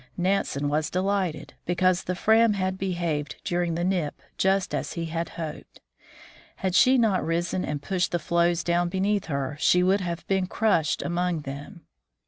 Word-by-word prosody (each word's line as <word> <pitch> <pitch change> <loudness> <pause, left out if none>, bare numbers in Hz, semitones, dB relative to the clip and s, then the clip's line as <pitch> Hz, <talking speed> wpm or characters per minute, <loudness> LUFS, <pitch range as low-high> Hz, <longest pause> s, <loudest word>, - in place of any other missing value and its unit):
Nansen 180 -6 0
was 150 +2 0
delighted, 185 -5 -1
because 180 +1 +2
the 180 - -2
Fram 220 +3 +4
had 185 -1 -1
behaved 170 -6 -2
during 175 -1 -1
the 170 - -1
nip 175 -5 -1 0.2
just 190 0 +1
as - - -2
he 170 -1 -3
had 165 +1 -3
hoped. 160 -2 -7 0.8
Had 190 -2 -2
she 255 +6 +6
not 220 -6 +2
risen 170 +2 -1
and 145 -1 -4
pushed 180 0 0
the 175 - +1
floes 170 +1 +1
down 175 0 +1
beneath 195 +2 0
her, 140 -2 -3
she 180 +3 +4
would 195 +2 +3
have 170 -2 -4
been 190 -1 0
crushed 170 -9 +1
among 175 -1 -1
them. 145 +6 -8
175 Hz, 165 wpm, -26 LUFS, 165-190 Hz, 0.8 s, she